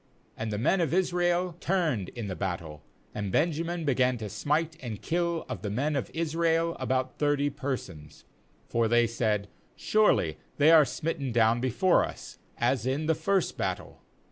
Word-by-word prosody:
— - - -28
^And 110 - -2
the 105 - -2
men 175 - +2
of 165 -1 0
Israel 175 -1 +1
turned 160 - 0
in 120 -3 -6
the 95 - -4
battle, 85 -5 -4 0.3
and 105 -2 -3
Benjamin 165 - 0
began 130 -2 +2
to 110 -2 -6
smite 150 - -1
and 115 -5 -5
kill 170 -1 -1
of - - -5
the 105 - -3
men 140 +9 -1
of 140 - -2
Israel 165 +1 0
about 130 0 -1
thirty 145 -1 +1
persons; 95 - -6 0.4
for 115 -1 +1
they 120 +1 +4
said: 110 -3 -1 0.3
'Surely 90 - +2 0.2
they 150 +2 +6
are 160 -3 +8
smitten 140 +1 -3
down 115 0 +3
before 130 +9 +3
us, - - -8 0.2
as 120 0 +1
in 140 +4 -1
the 160 - +3
first 195 +3 0
battle.' - - -4
135 Hz, 170 wpm, -28 LUFS, 115-165 Hz, 0.4 s, are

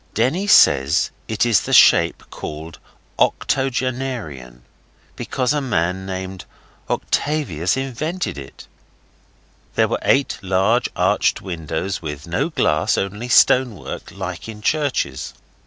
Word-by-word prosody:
Denny 145 - +1
says 70 - +5 0.2
it 110 +1 0
is 115 -6 +3
the - - -4
shape - - +5
called 80 +2 -8 0.4
octogenarian; 125 - -2 0.5
because 130 +2 -1
a 150 - 0
man 95 -6 -1
named 95 0 -6 0.4
Octagius 100 - -1
invented 145 - -3
it. 70 -1 -11 1.1
There - - +3
were - - -2
eight 140 0 +1
large 95 +6 +1
arched - - +1
windows 85 +1 -4
with 75 -3 -6
no 90 - -1
glass, 85 - +1
only 105 +5 -3
stone 125 0 +5
work, - - -8
like 95 0 -6
in 105 -1 -9
churches. 140 - -1
100 Hz, 115 wpm, -20 LUFS, 85-130 Hz, 1.1 s, says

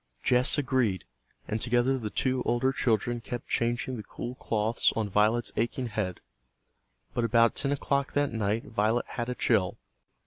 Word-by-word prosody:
Jess 125 +3 +4
agreed, 125 -10 0 0.4
and 110 +1 -2
together 120 +2 +2
the 110 -3 -4
two 130 +3 0
older 120 +3 +1
children 120 -2 0
kept 120 +1 -6
changing 120 +2 -1
the 105 - -6
cool 120 +4 -6
cloths 110 -2 +1
on 110 -2 0
Violet's 110 +4 +2
aching 120 +2 -1
head. 100 -5 -3 0.9
But 120 - 0
about 115 0 +4
ten 140 - -1
o'clock 140 0 0
that 145 -1 +1
night 110 0 -1
Violet 110 +2 0
had 120 -1 -4
a 125 - -2
chill. 100 -8 +1
120 Hz, 160 wpm, -28 LUFS, 110-125 Hz, 0.9 s, Jess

